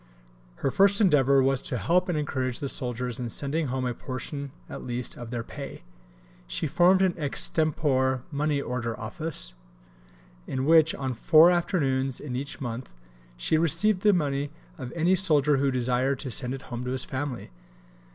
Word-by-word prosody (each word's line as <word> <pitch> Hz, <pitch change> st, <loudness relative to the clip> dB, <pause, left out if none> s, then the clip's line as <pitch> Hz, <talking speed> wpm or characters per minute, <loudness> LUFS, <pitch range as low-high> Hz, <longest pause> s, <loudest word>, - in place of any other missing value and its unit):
Her 135 Hz, -, -1 dB
first 200 Hz, 0 st, +4 dB
endeavour 140 Hz, -, +4 dB
was 135 Hz, -1 st, +1 dB
to 125 Hz, -, -4 dB
help 180 Hz, +7 st, +1 dB
and 170 Hz, -, 0 dB
encourage 130 Hz, -4 st, -2 dB
the 140 Hz, -3 st, -3 dB
soldiers 125 Hz, -1 st, -2 dB
in 120 Hz, -2 st, -3 dB
sending 145 Hz, +6 st, -1 dB
home 130 Hz, 0 st, -2 dB
a 125 Hz, -, -1 dB
portion 140 Hz, +3 st, -6 dB, 0.2 s
at -, -, -8 dB
least 120 Hz, 0 st, -4 dB
of 120 Hz, -2 st, -8 dB
their 120 Hz, -1 st, -3 dB
pay. 140 Hz, +3 st, -9 dB, 0.6 s
She -, -, -3 dB
formed 185 Hz, +2 st, +4 dB
an 185 Hz, -2 st, +2 dB
extempore 140 Hz, -3 st, +1 dB
Money 145 Hz, 0 st, 0 dB
Order 120 Hz, -4 st, -3 dB
Office, 160 Hz, -, -6 dB, 0.9 s
in 130 Hz, 0 st, -2 dB
which, 160 Hz, 0 st, +5 dB
on 130 Hz, -2 st, -3 dB
four 155 Hz, +8 st, +6 dB
afternoons 135 Hz, -7 st, 0 dB
in 130 Hz, -4 st, -6 dB
each 140 Hz, +3 st, -5 dB
month, 120 Hz, -1 st, -5 dB, 0.5 s
she 155 Hz, -, +1 dB
received 180 Hz, +5 st, +2 dB
the 210 Hz, -, +5 dB
money 145 Hz, -5 st, 0 dB, 0.3 s
of 130 Hz, -3 st, -7 dB
any 170 Hz, +3 st, +3 dB
soldier 150 Hz, -6 st, +3 dB
who 140 Hz, +1 st, +2 dB
desired 130 Hz, +1 st, 0 dB
to 130 Hz, -, -4 dB
send 125 Hz, +3 st, 0 dB
it 135 Hz, -, -10 dB
home 120 Hz, +1 st, -4 dB
to -, -, -3 dB
his 130 Hz, -, -1 dB
family. 130 Hz, -2 st, -5 dB
140 Hz, 170 wpm, -26 LUFS, 125-160 Hz, 0.9 s, four